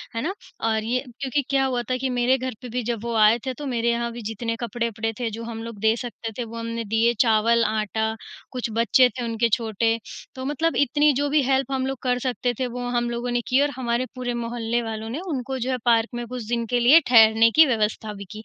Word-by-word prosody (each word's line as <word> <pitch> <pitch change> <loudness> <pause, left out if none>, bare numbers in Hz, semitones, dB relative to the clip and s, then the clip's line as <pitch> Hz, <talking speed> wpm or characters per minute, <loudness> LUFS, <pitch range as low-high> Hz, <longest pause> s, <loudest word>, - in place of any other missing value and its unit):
है 230 - -1
ना? 370 +7 -2 0.3
और 220 -1 0
ये 250 +3 -1 0.2
क्योंकि 275 +1 0
क्या 270 -1 +2
हुआ 250 -2 0
था 255 - +1
कि 260 0 -2
मेरे 250 +1 +2
घर 255 -1 -4
पे 250 - -8
भी 245 +1 -2
जब 230 -1 -3
वो 235 0 -3
आए 215 +1 +5
थे 260 - -2
तो 290 +3 -8
मेरे 235 -3 0
यहाँ 235 0 -1
भी 235 0 -8
जितने 230 +1 -3
कपड़े-वपड़े 230 -1 -2
थे 235 -2 -1
जो 230 +2 -6
हम 225 -1 -6
लोग 230 -3 -8
दे 220 +1 +3
सकते 235 -2 -6
थे 245 - -2
वो 230 0 -8
हमने 230 0 -4
दिए 225 +3 +2
चावल, 230 0 +4
आटा, 220 +1 -1 0.4
कुछ 250 -3 -3
बच्चे 235 +2 +4
थे 250 -1 -6
उनके 230 0 0
छोटे 225 0 +1 0.4
तो 260 0 -6
मतलब 310 +4 0
इतनी 290 +2 +3
जो 285 +2 0
भी 295 0 +3
हेल्प 270 +1 +1
हम 260 -1 0
लोग 270 -1 -3
कर 250 -1 +1
सकते 250 -1 -1
थे 255 - 0
वो 245 0 -5
हम 240 -1 0
लोगों 240 +1 -3
ने 240 0 +1
की 260 +2 +3
और 290 - +2
हमारे 245 0 -1
पूरे 245 -1 -3
मोहल्ले 235 0 -2
वालों 220 -1 -5
ने 275 +7 -4
उनको 265 -2 -3
जो 255 +2 -1
है 255 - 0
पार्क 230 -1 +3
में 240 0 -4
कुछ 250 -1 -6
दिन 235 -1 -1
के 245 +1 +1
लिए 265 +8 +7
ठहरने 225 -1 +6
की 320 0 +8
व्यवस्था 220 -3 -1
भी 200 0 -9
की। 215 0 -8
235 Hz, 245 wpm, -24 LUFS, 225-255 Hz, 0.4 s, की